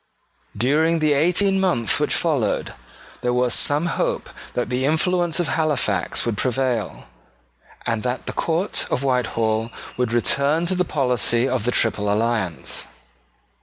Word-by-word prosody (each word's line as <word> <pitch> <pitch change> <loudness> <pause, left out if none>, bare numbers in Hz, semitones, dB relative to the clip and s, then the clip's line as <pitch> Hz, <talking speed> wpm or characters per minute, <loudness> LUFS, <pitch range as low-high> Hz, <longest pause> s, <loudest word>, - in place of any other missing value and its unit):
During 155 +7 +2
the 155 -2 +2
eighteen 180 +6 +2
months 140 - +2
which 150 - +1
followed, 145 - 0 0.5
there 125 0 0
was 125 -1 +1
some 145 +3 +3
hope 170 - -2 0.2
that 125 - -1
the 125 +1 0
influence 170 +3 +1
of 175 - 0
Halifax 145 - 0
would 115 -4 -1
prevail, 125 -3 -1 0.8
and 110 -1 -1
that 125 +1 -3
the - - -4
court 170 +4 -1
of 130 - -1
Whitehall 115 -4 0 0.3
would 125 -2 0
return 140 - +2
to 180 - +1
the 180 0 +1
policy 125 -5 +1
of 130 -4 -1
the 125 - +2
Triple 105 -4 +1
Alliance. 105 - -1
130 Hz, 140 wpm, -22 LUFS, 115-160 Hz, 0.8 s, some